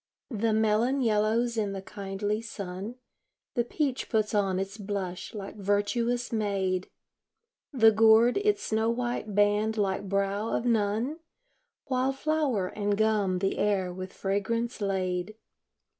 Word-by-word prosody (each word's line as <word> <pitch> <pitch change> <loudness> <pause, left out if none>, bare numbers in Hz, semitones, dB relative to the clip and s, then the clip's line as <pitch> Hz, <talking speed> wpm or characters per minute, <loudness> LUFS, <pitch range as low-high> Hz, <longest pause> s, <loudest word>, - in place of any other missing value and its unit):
The 225 0 0
melon 220 +5 +2
yellows 225 +1 +1
in 205 -2 0
the 195 - -5
kindly 205 +2 -3
sun, 200 0 -6 0.6
The 240 - +1
peach 265 +1 -2
puts 215 -2 +1
on 195 -3 +1
its 195 +1 -3
blush 195 0 -4
like 200 0 -7
virtuous 230 +5 0
maid, 195 -4 -1 0.8
The 225 -6 +6
gourd 225 +2 +5
its 410 0 +1
snow 220 +1 +1
white 240 -3 -2
band 205 +2 +2
like 195 -1 -1
brow 200 +2 0
of 230 - -1
nun, 230 +6 +1 0.7
While 260 0 0
flower 270 -10 0
and 205 -1 -1
gum 210 -4 +2
the 195 +1 -1
air 195 -3 +1
with 185 +1 -6
fragrance 230 +4 -2
lade. 190 0 -1
210 Hz, 130 wpm, -28 LUFS, 195-230 Hz, 0.8 s, The